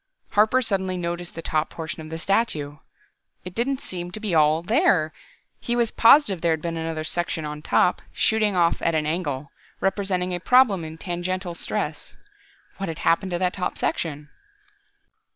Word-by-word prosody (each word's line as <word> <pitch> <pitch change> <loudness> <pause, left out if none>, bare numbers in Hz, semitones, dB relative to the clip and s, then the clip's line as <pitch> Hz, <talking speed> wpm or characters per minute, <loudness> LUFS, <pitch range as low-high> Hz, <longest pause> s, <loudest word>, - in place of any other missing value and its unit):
Harper 220 +5 +4
suddenly 190 -4 0
noticed 175 0 -4
the 165 - -6
top 155 0 0
portion 160 0 -6
of 155 - -9
the 160 - -5
statue. 165 -6 0 0.7
It 180 - -7
didn't 260 +5 -1
seem 175 -1 -5
to - - -5
be 210 -4 -2
all 155 +1 +4
there! 190 - +2 0.5
He 240 - -2
was 235 -2 +1
positive 230 - +5
there 170 -1 +3
had 160 - -3
been 170 -1 -2
another 160 -1 -3
section 165 -1 -2
on 150 0 -6
top, 180 - +2
shooting 215 -2 +1
off 170 -2 +2
at 165 - +1
an 155 -1 +1
angle, 150 -4 -2 0.3
representing 190 -2 0
a 175 - -2
problem 220 -3 +4
in 160 0 -7
tangential 175 +1 -3
stress. - - -3 0.6
What 195 -2 -3
had 160 - -5
happened 185 +3 +2
to - - +1
that 180 0 0
top 185 -2 -3
section? 150 -2 -2
175 Hz, 170 wpm, -24 LUFS, 160-195 Hz, 0.7 s, positive